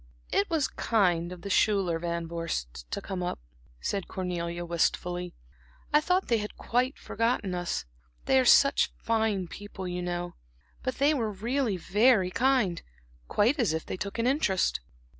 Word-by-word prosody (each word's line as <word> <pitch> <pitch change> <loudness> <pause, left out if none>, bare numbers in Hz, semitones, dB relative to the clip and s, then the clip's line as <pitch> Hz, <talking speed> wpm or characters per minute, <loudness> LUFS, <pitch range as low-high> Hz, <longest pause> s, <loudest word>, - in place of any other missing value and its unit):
"It 200 - +2
was 315 -4 +1
kind 180 -6 +1
of 180 -1 -9
the 200 - -4
Schuyler 190 -5 +2
Van 170 0 -3
Vorsts 155 - -4
to - - -3
come 190 -2 -4
up," 175 - -2 0.4
said 195 - -2
Cornelia, 175 -2 -3
wistfully. 175 +1 -1 0.6
"I 300 - +6
thought 365 +4 +1
they 230 -2 +2
had 210 0 -6
quite 250 +3 0
forgotten 230 -5 -1
us 175 - -2 0.4
they 265 - +4
are - - +4
such 275 +3 +5
fine 220 -5 0
people, 190 +1 -7
you 180 0 -3
know 175 0 -3 0.5
but 255 - -2
they 285 +3 +3
were 230 -7 -1
really 230 +1 -1
very 200 +1 +3
kind, 245 -7 +2 0.5
quite 245 +8 +2
as 220 -10 +2
if 160 - -3
they - - -4
took 200 +4 -5
an 230 - 0
interest." 250 - +2
195 Hz, 160 wpm, -28 LUFS, 175-235 Hz, 0.6 s, I